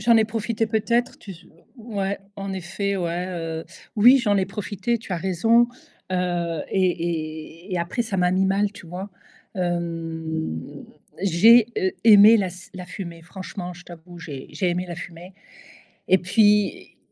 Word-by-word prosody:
J'en 230 Hz, +2 st, +5 dB
ai 220 Hz, -, +4 dB
profité 225 Hz, 0 st, -2 dB
peut-être 230 Hz, +3 st, 0 dB
tu 200 Hz, -, -11 dB
s 175 Hz, -1 st, -12 dB, 0.3 s
ouais 200 Hz, -4 st, -3 dB, 0.2 s
en 195 Hz, -1 st, -5 dB
effet 190 Hz, +2 st, -3 dB
ouais, 175 Hz, 0 st, -2 dB
heu. 165 Hz, -2 st, -4 dB, 0.3 s
Oui 245 Hz, +6 st, +7 dB
j'en 205 Hz, -5 st, +2 dB
ai 190 Hz, -1 st, +1 dB
profité 205 Hz, +3 st, -3 dB
tu 205 Hz, -, -8 dB
as -, -, 0 dB
raison. 225 Hz, +7 st, +3 dB, 0.4 s
Heu 175 Hz, -3 st, -1 dB
et 170 Hz, -2 st, -2 dB
et -, -, -5 dB
et 180 Hz, -, 0 dB
après, 170 Hz, +8 st, -1 dB
ça 220 Hz, -4 st, -4 dB
m'a 180 Hz, 0 st, +3 dB
mis 190 Hz, +1 st, +2 dB
mal, 200 Hz, +1 st, +1 dB
tu 195 Hz, -, -13 dB
vois? 180 Hz, +4 st, -6 dB, 0.5 s
Hem, 165 Hz, -, -4 dB, 0.4 s
j'ai, 210 Hz, +6 st, +6 dB
heu, 185 Hz, -, 0 dB
aimé 215 Hz, 0 st, +9 dB
la 195 Hz, -4 st, 0 dB
s 180 Hz, +1 st, -12 dB
la 180 Hz, -1 st, -7 dB
fumer, 170 Hz, -2 st, -8 dB
franchement, 180 Hz, +1 st, -7 dB
je 175 Hz, +1 st, -14 dB
t'avoue, 175 Hz, 0 st, -12 dB
j'ai 145 Hz, -5 st, -8 dB
j'ai 185 Hz, -, -1 dB
aimé 180 Hz, +1 st, -2 dB
la 170 Hz, -, -6 dB
fumer 175 Hz, +2 st, -9 dB, 0.8 s
et 185 Hz, -, +6 dB
puis, 205 Hz, +2 st, +2 dB
185 Hz, 165 wpm, -23 LUFS, 170-205 Hz, 0.8 s, aimé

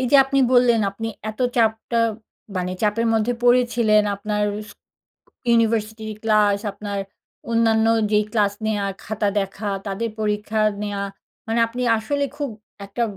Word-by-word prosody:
এইযে 260 Hz, +2 st, +4 dB
আপনি 275 Hz, 0 st, 0 dB
বললেন 245 Hz, -2 st, +5 dB
আপনি 225 Hz, +3 st, -6 dB, 0.2 s
এত 215 Hz, -, -13 dB, 0.2 s
চাপটা 225 Hz, +1 st, +1 dB, 0.6 s
মানে, 180 Hz, 0 st, -2 dB
চাপের 220 Hz, +2 st, +1 dB
মধ্যে 220 Hz, +2 st, +1 dB
পড়েছিলেন। 240 Hz, -3 st, +4 dB
আপনার 210 Hz, +1 st, -2 dB, 0.3 s
স -, -, -11 dB, 0.8 s
ইউনিভার্সিটি'র 220 Hz, -1 st, +1 dB
ক্লাস, 210 Hz, -2 st, +3 dB
আপনার 200 Hz, 0 st, -5 dB, 0.5 s
অন্যান্য 225 Hz, -1 st, +3 dB, 0.2 s
যেই 210 Hz, 0 st, +3 dB
ক্লাস 205 Hz, -3 st, +2 dB
নেয়া, 205 Hz, -2 st, 0 dB, 0.2 s
খাতা 210 Hz, -1 st, -1 dB
দেখা, 195 Hz, +2 st, -4 dB, 0.2 s
তাদের 215 Hz, +3 st, -2 dB
পরীক্ষা 210 Hz, +1 st, -1 dB, 0.2 s
নেওয়া। 200 Hz, -1 st, -2 dB, 0.4 s
মানে 230 Hz, +1 st, +1 dB
আপনি 245 Hz, +2 st, -5 dB, 0.2 s
আসলে 285 Hz, +6 st, -1 dB
খুব 290 Hz, -3 st, -3 dB, 0.4 s
একটা 200 Hz, +4 st, -3 dB
220 Hz, 130 wpm, -22 LUFS, 210-230 Hz, 0.8 s, বললেন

